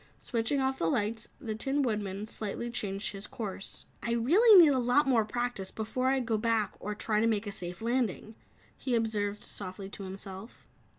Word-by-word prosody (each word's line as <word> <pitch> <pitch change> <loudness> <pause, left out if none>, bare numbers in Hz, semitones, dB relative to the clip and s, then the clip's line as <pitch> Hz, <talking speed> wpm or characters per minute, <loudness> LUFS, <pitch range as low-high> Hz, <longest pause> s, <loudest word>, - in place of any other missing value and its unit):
Switching 235 +3 0
off 265 0 0
the 165 - +1
lights, 215 +5 -1
the 230 -7 -4
Tin 270 +6 0
Woodman 210 -4 -2
slightly 220 +2 -3
changed 200 -4 -2
his 195 0 -6
course. 200 -3 -5 0.2
"I 235 - -1
really 370 - +7
need 315 -5 +8
a 260 - +2
lot 250 +4 +3
more 245 -5 +4
practice 240 -3 -2
before 225 +4 -2
I 265 0 +3
go 225 -3 0
back 225 -2 +1
or 210 +1 -4
try 210 0 0
to 225 - +3
make 220 -1 +1
a 205 - -4
safe 180 +1 -5
landing," 230 -3 -1 0.4
he 255 -3 -1
observed 210 -2 -1
softly 190 0 -6
to 200 - -8
himself. 195 +3 -8
225 Hz, 185 wpm, -30 LUFS, 205-245 Hz, 0.4 s, need